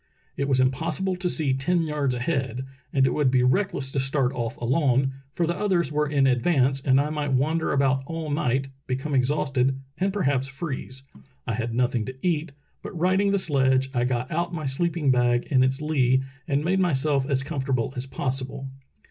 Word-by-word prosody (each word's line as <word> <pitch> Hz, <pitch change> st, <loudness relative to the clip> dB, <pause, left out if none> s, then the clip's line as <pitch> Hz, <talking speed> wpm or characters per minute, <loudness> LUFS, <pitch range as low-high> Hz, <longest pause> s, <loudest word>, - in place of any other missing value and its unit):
It 140 Hz, -, -1 dB
was 130 Hz, -1 st, +3 dB
impossible 135 Hz, +9 st, 0 dB
to 180 Hz, 0 st, -1 dB
see 150 Hz, -6 st, +1 dB
ten 165 Hz, +6 st, +1 dB
yards 150 Hz, -5 st, -1 dB
ahead, 130 Hz, -1 st, -2 dB, 0.3 s
and 135 Hz, -1 st, +3 dB
it -, -, +1 dB
would 145 Hz, -3 st, +2 dB
be 125 Hz, -1 st, +3 dB
reckless 135 Hz, -1 st, +1 dB
to 135 Hz, -, -1 dB
start 135 Hz, -1 st, +1 dB
off 120 Hz, +2 st, -3 dB
alone, 135 Hz, +1 st, +1 dB, 0.2 s
for 170 Hz, -, 0 dB
the 170 Hz, +1 st, -1 dB
others 185 Hz, -4 st, +1 dB
were 150 Hz, 0 st, +1 dB
in 140 Hz, -2 st, +3 dB
ad 125 Hz, -2 st, +2 dB
vance, 135 Hz, -4 st, +2 dB
and 130 Hz, 0 st, +3 dB
I 150 Hz, +2 st, 0 dB
might 145 Hz, -3 st, -2 dB
wander 155 Hz, +5 st, +1 dB
about 135 Hz, -1 st, +2 dB
all 165 Hz, -2 st, -4 dB
night, 135 Hz, -1 st, 0 dB, 0.2 s
become 135 Hz, +3 st, -3 dB
ex 130 Hz, -1 st, +3 dB
hausted, 135 Hz, -3 st, +1 dB, 0.2 s
and 195 Hz, +2 st, +1 dB
perhaps 140 Hz, -9 st, 0 dB
freeze. 135 Hz, -2 st, -6 dB, 0.4 s
I 115 Hz, -, -2 dB
had 115 Hz, +1 st, -3 dB
nothing 120 Hz, -2 st, +1 dB
to 130 Hz, -, -6 dB
eat, 165 Hz, -3 st, 0 dB, 0.3 s
but 180 Hz, -, -7 dB
righting 190 Hz, +4 st, +2 dB
the 200 Hz, -, +2 dB
sledge 135 Hz, -6 st, +1 dB
I 120 Hz, -1 st, +1 dB
got 125 Hz, 0 st, -2 dB
out 170 Hz, +2 st, -1 dB
my 160 Hz, -3 st, -4 dB
sleeping 155 Hz, +1 st, +1 dB
bag 120 Hz, -1 st, +2 dB
in 130 Hz, -2 st, +4 dB
its 130 Hz, +3 st, 0 dB
lee 130 Hz, -4 st, +2 dB, 0.2 s
and 145 Hz, +2 st, 0 dB
made 190 Hz, +2 st, +2 dB
myself 145 Hz, -5 st, +1 dB
as 135 Hz, -2 st, +1 dB
comfortable 135 Hz, -5 st, -2 dB
as 125 Hz, +1 st, -4 dB
possible." 135 Hz, 0 st, -3 dB
135 Hz, 195 wpm, -25 LUFS, 130-155 Hz, 0.4 s, in